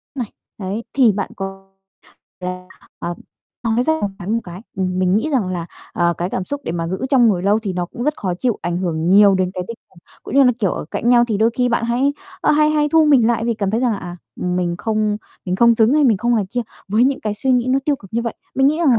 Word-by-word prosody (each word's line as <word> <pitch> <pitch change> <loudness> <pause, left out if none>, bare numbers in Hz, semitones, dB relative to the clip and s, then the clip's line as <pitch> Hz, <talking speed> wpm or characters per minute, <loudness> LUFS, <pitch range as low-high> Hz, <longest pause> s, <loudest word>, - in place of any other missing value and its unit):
này. 240 -5 -4 0.3
Đấy, 200 +4 -4
thì 255 -5 +5
bạn 200 0 -3
có 195 0 -7 0.7
là, 180 0 -5 0.3
ờ, 175 - -4 0.5
nói 230 +2 +2
ra 315 - +2
một 205 - +1
cái, 180 - -8
một 230 +1 +1
cái, 175 +1 -9 0.2
ừm, 185 -1 -1
mình 185 +1 +2
nghĩ 305 +8 0
rằng 235 -10 +1
là, 175 -2 -3 0.3
ờ, 170 0 +1
cái 175 +2 -2
cảm 185 - -2
xúc 285 +7 -4
để - - -3
mà 165 -1 -2
giữ 185 - -3
trong 245 -4 +5
người 180 -4 +1
lâu 205 +2 +3
thì 210 -4 -4
nó 180 -1 -2
cũng 235 - -7
rất 300 +2 0
khó 185 -3 -2
chịu 235 +4 -1
ảnh 175 0 -1
hưởng 165 -3 -2
nhiều 200 +1 +6
đến 185 -1 0
cái 180 - -3
tinh 230 - -6
thần, 175 - -20 0.2
cũng 240 - -7
như 275 - +6
là, 250 - +5
kiểu, 200 -6 +1
ở - - -4
cạnh 235 - -1
nhau 240 -1 +6
thì 215 - 0
đôi 225 +1 +3
khi 250 -1 +2
bạn 235 0 0
hãy, 255 +4 +1 0.3
ơ, - - +2
hay 305 0 +4
hay 300 -1 +2
thu 320 +1 +4
mình 270 -7 +5
lại 230 -1 +1
vì 235 -1 0
cảm 200 -3 -1
thấy 225 +3 0
rằng 245 -3 +2
là, 200 - -3
à, 175 -1 -7 0.2
mình 180 -1 -1
không 215 -1 0 0.3
mình 180 0 -1
không 235 +1 +5
xứng 225 +4 +3
hay 300 -1 +4
mình 225 -6 +4
không 240 +3 +1
này 210 - +1
kia 245 - -1 0.3
với 220 +5 +3
những 275 0 +1
cái 210 -1 -2
suy 260 +4 0
nghĩ 245 0 +2
nó 265 - +3
tiêu 290 -2 +1
cực 195 -4 -16
như 235 - 0
vậy. 235 - -3 0.2
Mình 270 +1 +3
nghĩ 305 +3 +2
rằng 275 -9 +4
220 Hz, 280 wpm, -19 LUFS, 185-245 Hz, 0.7 s, nhiều